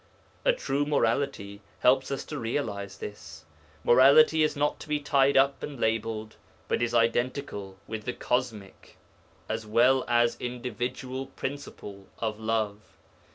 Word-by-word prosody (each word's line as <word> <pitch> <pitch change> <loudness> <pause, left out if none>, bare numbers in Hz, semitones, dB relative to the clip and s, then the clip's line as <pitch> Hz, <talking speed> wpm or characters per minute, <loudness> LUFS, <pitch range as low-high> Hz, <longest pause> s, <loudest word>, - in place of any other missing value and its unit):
A - - +5
true 145 - -1
morality 115 -7 -1 0.2
helps 130 +1 +4
us 140 - -3
to 150 - -5
realize 100 -5 -3
this 80 -6 -9 0.4
morality 140 +6 +6
is 155 0 +2
not 145 +1 0
to - - -10
be 150 -1 0
tied 140 -1 +3
up 135 0 +3
and 140 -4 -6
labelled, 110 -1 -2 0.3
but - - 0
is 120 0 0
identical 115 -4 0
with 110 -1 -6
the 125 - -2
cosmic 115 -6 -3 0.5
as 110 0 -4
well 125 +4 +4
as 120 0 +2
individual 125 +2 -4
principle 105 -8 -7
of 110 -2 -3
Love. 110 -2 -1
120 Hz, 135 wpm, -28 LUFS, 110-140 Hz, 0.5 s, morality